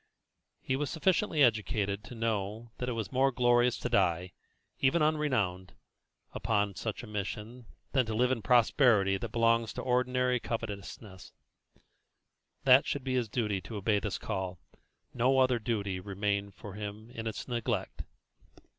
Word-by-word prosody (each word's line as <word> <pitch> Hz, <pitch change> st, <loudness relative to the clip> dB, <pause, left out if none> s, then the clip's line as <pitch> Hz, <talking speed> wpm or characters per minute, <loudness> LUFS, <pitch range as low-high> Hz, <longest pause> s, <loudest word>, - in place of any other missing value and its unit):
He 130 Hz, -, 0 dB
was 145 Hz, 0 st, -2 dB
sufficiently 165 Hz, -2 st, +2 dB
educated 105 Hz, -3 st, +1 dB
to 120 Hz, -, -9 dB
know 110 Hz, 0 st, -2 dB
that 125 Hz, -, -2 dB
it -, -, -1 dB
was 115 Hz, -3 st, -4 dB
more 135 Hz, +1 st, +3 dB
glorious 120 Hz, -1 st, +3 dB
to -, -, -3 dB
die, 90 Hz, -6 st, +1 dB, 0.5 s
even 135 Hz, +4 st, +3 dB
unrenowned, 130 Hz, -13 st, 0 dB, 0.6 s
upon 105 Hz, -3 st, 0 dB
such 110 Hz, +4 st, -5 dB
a -, -, -6 dB
mission, 105 Hz, +3 st, -6 dB, 0.2 s
than 130 Hz, -4 st, +2 dB
to 110 Hz, -, -2 dB
live 125 Hz, +3 st, +2 dB
in 130 Hz, -, 0 dB
the -, -, -11 dB
prosperity 110 Hz, -3 st, +4 dB
that 110 Hz, +2 st, -6 dB
belongs 115 Hz, -1 st, +2 dB
to -, -, -5 dB
ordinary 125 Hz, 0 st, +1 dB
covetousness, 105 Hz, -4 st, -6 dB, 1.3 s
that 130 Hz, +1 st, +6 dB
should 145 Hz, -, -1 dB
it -, -, -18 dB
be 130 Hz, -, -1 dB
his 125 Hz, -4 st, 0 dB
duty 105 Hz, -4 st, -1 dB
to 110 Hz, -, -8 dB
obey 105 Hz, +1 st, +1 dB
this -, -, -3 dB
call, 95 Hz, -1 st, -4 dB, 0.6 s
no 130 Hz, +2 st, +2 dB
other 130 Hz, -2 st, +3 dB
duty 100 Hz, -4 st, -2 dB
remained 100 Hz, +1 st, -2 dB
for 105 Hz, -, -9 dB
him 105 Hz, +2 st, -7 dB
in 115 Hz, -1 st, -5 dB
its 110 Hz, -, -5 dB
neglect. 120 Hz, -5 st, -2 dB
115 Hz, 155 wpm, -30 LUFS, 100-125 Hz, 1.3 s, that